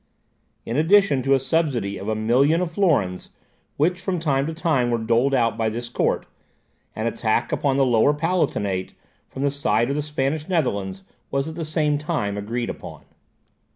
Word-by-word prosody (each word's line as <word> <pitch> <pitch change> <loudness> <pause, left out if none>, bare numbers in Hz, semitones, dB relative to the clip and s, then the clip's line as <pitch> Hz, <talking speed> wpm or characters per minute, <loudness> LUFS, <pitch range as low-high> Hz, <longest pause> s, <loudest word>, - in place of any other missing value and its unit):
In 115 - -2
addition 165 -3 +4
to 135 +2 +3
a - - +2
subsidy 130 -8 -1
of 100 - -7
a 110 - 0
million 130 +9 +3
of 180 -2 -2
florins, 145 - +1 0.5
which 180 +5 +1
from 185 -1 -2
time 140 -3 0
to 160 - -3
time 145 -7 +1
were 120 - +1
doled 120 +4 +2
out 115 -3 +1
by 110 -1 +1
this 120 +2 -5
court, - - 0 0.7
an 110 - -3
attack 115 -1 0
upon 140 -2 +1
the 135 0 +3
Lower 120 +2 +4
Palatinate, 145 - -1 0.3
from 135 - -5
the 140 - +2
side 125 -3 +1
of - - -1
the 150 - 0
Spanish 150 +2 -2
Netherlands, 100 - -1 0.3
was 140 +1 -1
at 160 - -5
the 165 0 -5
same 150 -1 +1
time 145 -10 -2
agreed 115 +4 -3
upon. - - -10
135 Hz, 180 wpm, -23 LUFS, 115-155 Hz, 0.7 s, addition